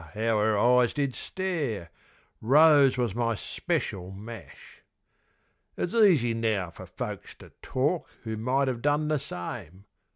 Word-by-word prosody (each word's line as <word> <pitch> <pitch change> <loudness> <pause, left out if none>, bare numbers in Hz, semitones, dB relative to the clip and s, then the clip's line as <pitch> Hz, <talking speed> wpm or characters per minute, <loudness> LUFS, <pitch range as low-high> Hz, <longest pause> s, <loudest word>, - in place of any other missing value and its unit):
how 110 0 +1
'er 105 0 +2
eyes 125 +2 +4
did 140 -3 -1
stare) 145 - -3 0.5
Rose 145 +2 +6
was 120 -5 0
my 115 0 0
speshul 95 -1 -3
mash. 110 +4 -11 1.0
It's 175 - -2
easy 175 - +4
now 110 -6 -1
fer - - -11
folks - - -7
to - - -15
talk 145 +7 -1
who 110 -2 -4
might 130 +5 0
have 125 -2 -2
done 145 +2 +1
the 155 -2 +1
same. 95 - -7
120 Hz, 135 wpm, -27 LUFS, 110-145 Hz, 1.0 s, Rose